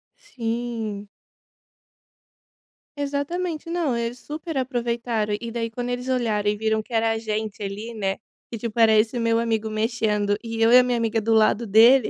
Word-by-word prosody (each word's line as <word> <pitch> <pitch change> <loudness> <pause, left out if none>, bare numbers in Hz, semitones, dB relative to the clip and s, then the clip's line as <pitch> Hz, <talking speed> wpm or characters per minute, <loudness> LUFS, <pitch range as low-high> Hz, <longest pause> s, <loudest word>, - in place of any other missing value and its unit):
Sim. 230 - -4 1.9
Exatamente. 305 +4 -3
Não, 335 -7 0
eles 235 +1 -3
super 310 +2 -6
aproveitaram 235 -4 -1
e 235 -1 -6
daí 230 0 -2
quando 245 +2 -4
eles 245 +1 -3
olharam 220 -5 +1
e 210 - +1
viram 220 0 +1
que 235 - -13
era 225 0 +2
a 225 - 0
gente 215 -1 -3
ali, 210 +4 -5
né, 195 -3 -2 0.3
que 230 - -4
tipo 230 +1 -4
era 220 -1 +6
esse 220 +3 +2
meu 230 0 +2
amigo 225 -1 0
mexendo 215 -2 0
e 225 0 -4
eu 225 - +5
e 250 - +9
a - - +5
minha 250 -1 0
amiga 225 -1 0
do 225 +1 +1
lado 220 +1 +3
dele, 230 +4 +6
230 Hz, 175 wpm, -24 LUFS, 220-245 Hz, 1.9 s, e